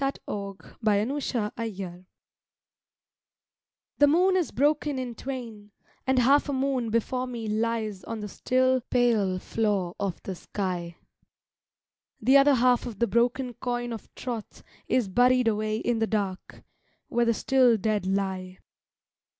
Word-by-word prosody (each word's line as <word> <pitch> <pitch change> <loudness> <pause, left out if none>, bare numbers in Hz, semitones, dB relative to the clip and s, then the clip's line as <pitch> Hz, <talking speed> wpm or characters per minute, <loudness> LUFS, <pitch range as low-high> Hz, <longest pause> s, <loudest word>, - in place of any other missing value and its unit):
TROTH 275 0 0
WITH 200 -1 -7
THE 220 +1 0 0.3
DEAD 180 -1 -7 1.9
THE 290 - +7
moon 360 +5 +4
is 360 -4 +1
broken 290 0 +1
in 255 -2 -4
twain, 230 -5 -7 0.4
and 265 0 +2
half 275 +4 +4
a - - 0
moon 265 -3 0
Before 250 +3 -1
me 235 -3 -5
lies 215 -2 -1
on 225 - -5
the 210 - -5
still, 255 +4 +1
pale 225 -7 +2
floor 200 -3 -1
of 195 -4 -2
the 190 - -4
sky; 180 -2 -4 1.2
The 260 +5 +4
other 280 0 +7
half 245 0 +3
of 225 -5 -7
the 235 - +2
broken 240 +3 +1
coin 240 0 -3
of 225 - -9
troth 235 -4 -6 0.2
Is 250 -5 +1
buried 250 +4 +3
away 215 0 0
in 235 0 -1
the 225 - +1
dark, 200 -4 -3 0.4
where 240 0 +1
the 230 -1 +2
still 255 -2 +4
dead 210 -2 -1
lie. 190 -1 -2
230 Hz, 140 wpm, -27 LUFS, 205-255 Hz, 1.9 s, THE